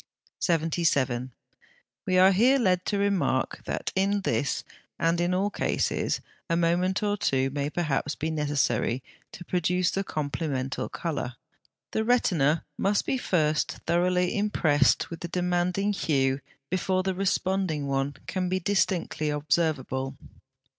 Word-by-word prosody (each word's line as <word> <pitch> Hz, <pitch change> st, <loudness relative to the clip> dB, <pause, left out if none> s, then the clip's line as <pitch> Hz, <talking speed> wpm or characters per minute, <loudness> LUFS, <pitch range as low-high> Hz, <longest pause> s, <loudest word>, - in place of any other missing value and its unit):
77. 155 Hz, -7 st, +1 dB, 0.8 s
We 185 Hz, -, +3 dB
are 190 Hz, +1 st, +7 dB
here 240 Hz, +8 st, +4 dB
led 185 Hz, -7 st, +2 dB
to 205 Hz, -, 0 dB
remark 190 Hz, -, 0 dB
that -, -, -3 dB
in 200 Hz, +1 st, +2 dB
this, 145 Hz, -6 st, 0 dB, 0.3 s
and 170 Hz, +1 st, +1 dB
in 175 Hz, +1 st, +1 dB
all 195 Hz, +3 st, +1 dB
cases, -, -, 0 dB, 0.3 s
a 165 Hz, -, +2 dB
moment 180 Hz, +4 st, +1 dB
or 205 Hz, 0 st, +1 dB
two 135 Hz, -9 st, +1 dB
may 140 Hz, +1 st, -2 dB
perhaps 150 Hz, -3 st, -1 dB
be 160 Hz, +2 st, -2 dB
necessary 140 Hz, -5 st, 0 dB, 0.3 s
to 175 Hz, -, -10 dB
produce 180 Hz, 0 st, +1 dB
the 195 Hz, -, -1 dB
complemental 145 Hz, -5 st, -3 dB
colour. 145 Hz, -7 st, -3 dB, 0.6 s
The 220 Hz, -, 0 dB
retina 170 Hz, -, +2 dB
must 200 Hz, +1 st, +1 dB
be 265 Hz, -, 0 dB
first 155 Hz, -8 st, +1 dB
thoroughly 180 Hz, +1 st, +2 dB
impressed 160 Hz, -11 st, +2 dB
with 165 Hz, -, -6 dB
the 175 Hz, -, -5 dB
demanding 180 Hz, +3 st, 0 dB
hue 135 Hz, -6 st, +1 dB, 0.3 s
before 185 Hz, 0 st, +1 dB
the 190 Hz, 0 st, 0 dB
responding 185 Hz, -4 st, 0 dB
one 135 Hz, 0 st, -1 dB
can 185 Hz, -1 st, -2 dB
be 185 Hz, +1 st, 0 dB
distinctly 170 Hz, -5 st, 0 dB
observable. 145 Hz, -3 st, -1 dB
170 Hz, 135 wpm, -27 LUFS, 145-185 Hz, 0.8 s, are